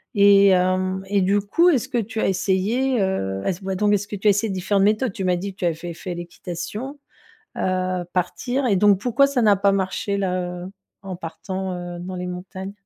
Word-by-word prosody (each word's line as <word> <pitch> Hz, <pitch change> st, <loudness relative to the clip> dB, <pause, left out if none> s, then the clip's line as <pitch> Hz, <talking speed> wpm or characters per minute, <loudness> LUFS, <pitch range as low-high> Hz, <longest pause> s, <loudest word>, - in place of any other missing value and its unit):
et 200 Hz, 0 st, +6 dB
hem, 185 Hz, +1 st, +1 dB
et 200 Hz, 0 st, +1 dB
du 200 Hz, +2 st, +3 dB
coup, 330 Hz, -, +3 dB
est-ce 260 Hz, -6 st, +1 dB
que 250 Hz, -, -1 dB
tu 225 Hz, +1 st, -4 dB
as -, -, +1 dB
essayé, 210 Hz, +7 st, +1 dB
heu 95 Hz, -, -1 dB
est-ce 185 Hz, 0 st, -2 dB
voit 190 Hz, 0 st, -3 dB
donc, 205 Hz, +2 st, +1 dB
mais 205 Hz, -, +5 dB
est-ce 200 Hz, 0 st, -3 dB
que 205 Hz, -, -5 dB
tu 200 Hz, +2 st, -1 dB
as -, -, +8 dB
essayé 205 Hz, +1 st, 0 dB
différentes 190 Hz, +1 st, +1 dB
méthodes? 215 Hz, +2 st, +2 dB
Tu 195 Hz, -, -4 dB
m'as 180 Hz, -1 st, +2 dB
dit 195 Hz, +2 st, -5 dB
que -, -, -31 dB
tu 180 Hz, -, -1 dB
avais 170 Hz, -, +2 dB
fait 170 Hz, +1 st, -7 dB
fait 175 Hz, +1 st, -6 dB
l'équitation, 175 Hz, -, -6 dB, 0.6 s
heu, 185 Hz, -1 st, -1 dB
partir, 245 Hz, +9 st, -1 dB
et 200 Hz, -, +3 dB
donc 200 Hz, 0 st, +4 dB
pourquoi 250 Hz, +4 st, +3 dB
ça 280 Hz, -3 st, 0 dB
n'a 210 Hz, -3 st, +5 dB
pas 200 Hz, 0 st, +3 dB
marché 195 Hz, +1 st, -1 dB
là, 180 Hz, -2 st, -2 dB
heu, 185 Hz, -, -8 dB, 0.3 s
en 190 Hz, -2 st, -6 dB
partant, 185 Hz, +3 st, -5 dB
heu, 175 Hz, -1 st, -6 dB
dans 185 Hz, +1 st, -6 dB
les 180 Hz, 0 st, -4 dB
montagnes? 185 Hz, +2 st, -7 dB
190 Hz, 225 wpm, -22 LUFS, 180-205 Hz, 0.6 s, as